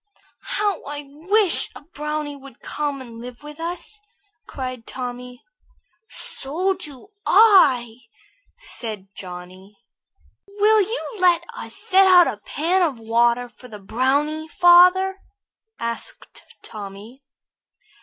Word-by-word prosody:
"How 410 Hz, -3 st, 0 dB
I 290 Hz, +1 st, -6 dB
wish 360 Hz, +7 st, +2 dB
a -, -, -10 dB
brownie 300 Hz, -1 st, -4 dB
would 275 Hz, -3 st, -14 dB
come 290 Hz, -2 st, -3 dB
and 230 Hz, -2 st, -10 dB
live 245 Hz, +2 st, -10 dB
with 300 Hz, +1 st, -11 dB
us!" 355 Hz, +5 st, -5 dB, 0.5 s
cried 255 Hz, -3 st, -6 dB
Tommy. 250 Hz, -1 st, -7 dB, 0.7 s
"So 350 Hz, +8 st, -2 dB
do 300 Hz, -2 st, -9 dB
I," 265 Hz, -, +5 dB, 0.6 s
said 220 Hz, -, -7 dB
Johnny. 185 Hz, +2 st, -10 dB, 0.7 s
"Will 420 Hz, +2 st, +3 dB
you 450 Hz, +3 st, -4 dB
let 350 Hz, -2 st, +4 dB
us -, -, -8 dB
set 385 Hz, 0 st, +4 dB
out 360 Hz, -2 st, +8 dB
a -, -, -3 dB
pan 330 Hz, -, 0 dB
of 310 Hz, -8 st, +1 dB
water 235 Hz, +2 st, +2 dB
for 240 Hz, +2 st, -16 dB
the 215 Hz, -3 st, -10 dB
brownie, 280 Hz, +9 st, 0 dB
father?" 360 Hz, +4 st, +5 dB, 0.6 s
asked 230 Hz, 0 st, -4 dB, 0.2 s
Tommy. 210 Hz, +4 st, -10 dB
290 Hz, 115 wpm, -22 LUFS, 240-360 Hz, 0.7 s, out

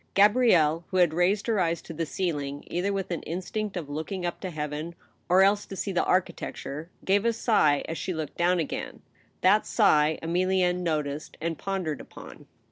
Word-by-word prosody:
Gabrielle, 195 Hz, -7 st, +4 dB
who 185 Hz, -, -1 dB
had 175 Hz, -3 st, +4 dB
raised 180 Hz, +5 st, +2 dB
her 225 Hz, -3 st, +1 dB
eyes 170 Hz, -2 st, +1 dB
to 165 Hz, -, -8 dB
the 165 Hz, 0 st, -3 dB
ceiling, 145 Hz, -6 st, -3 dB
either 180 Hz, +3 st, -1 dB
with 195 Hz, -2 st, -3 dB
an 170 Hz, -, -2 dB
instinct 190 Hz, +4 st, -4 dB
of 165 Hz, -5 st, -4 dB
looking 160 Hz, +6 st, -4 dB
up 175 Hz, -, -3 dB
to 185 Hz, -, -4 dB
heaven, 155 Hz, +1 st, -5 dB, 0.3 s
or 185 Hz, +2 st, +6 dB
else 200 Hz, +1 st, +3 dB
to 195 Hz, -, -7 dB
see 195 Hz, -, -3 dB
the 180 Hz, -, +1 dB
architecture, 165 Hz, -4 st, -2 dB, 0.2 s
gave 200 Hz, +1 st, +3 dB
a 235 Hz, -, +3 dB
sigh 210 Hz, -, +2 dB
as 165 Hz, -, -4 dB
she -, -, -3 dB
looked 160 Hz, -4 st, -4 dB
down 180 Hz, +1 st, +2 dB
again; 160 Hz, -, -4 dB, 0.4 s
that 200 Hz, +4 st, +4 dB
sigh 150 Hz, +1 st, +3 dB
Emilienne 180 Hz, +1 st, +1 dB
noticed 150 Hz, -3 st, -3 dB
and 165 Hz, -2 st, -3 dB
pondered 185 Hz, -7 st, -3 dB
upon. -, -, -12 dB
175 Hz, 185 wpm, -27 LUFS, 155-195 Hz, 0.4 s, or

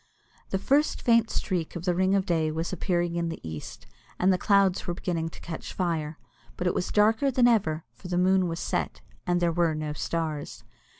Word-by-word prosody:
The 190 Hz, -, 0 dB
first 280 Hz, +9 st, +2 dB
faint 230 Hz, -1 st, +4 dB
streak 180 Hz, -5 st, -2 dB
of 175 Hz, 0 st, -5 dB
the 180 Hz, -, +2 dB
ring 190 Hz, +2 st, +2 dB
of 195 Hz, -1 st, +1 dB
day 160 Hz, -3 st, +1 dB
was 165 Hz, +3 st, -3 dB
appearing 175 Hz, -1 st, 0 dB
in 170 Hz, -1 st, -1 dB
the 165 Hz, -, -5 dB
east, 80 Hz, -1 st, -8 dB, 0.3 s
and 185 Hz, +1 st, +4 dB
the -, -, +1 dB
clouds 195 Hz, -2 st, +3 dB
were 175 Hz, -, -1 dB
beginning 165 Hz, -3 st, -2 dB
to -, -, -13 dB
catch 165 Hz, -2 st, -6 dB
fire, 160 Hz, -4 st, -2 dB, 0.4 s
but 180 Hz, -, -3 dB
it 180 Hz, -, +2 dB
was 180 Hz, -, -1 dB
darker 220 Hz, +6 st, +3 dB
than 250 Hz, -2 st, +4 dB
ever, 165 Hz, -9 st, +1 dB
for -, -, -11 dB
the 180 Hz, -1 st, -1 dB
moon 185 Hz, 0 st, +3 dB
was 165 Hz, 0 st, -3 dB
set, -, -, -2 dB, 0.3 s
and 175 Hz, 0 st, +2 dB
there 175 Hz, -1 st, +2 dB
were 165 Hz, -2 st, +2 dB
no 155 Hz, -1 st, -3 dB
stars. 155 Hz, -1 st, -3 dB
175 Hz, 205 wpm, -27 LUFS, 165-190 Hz, 0.4 s, faint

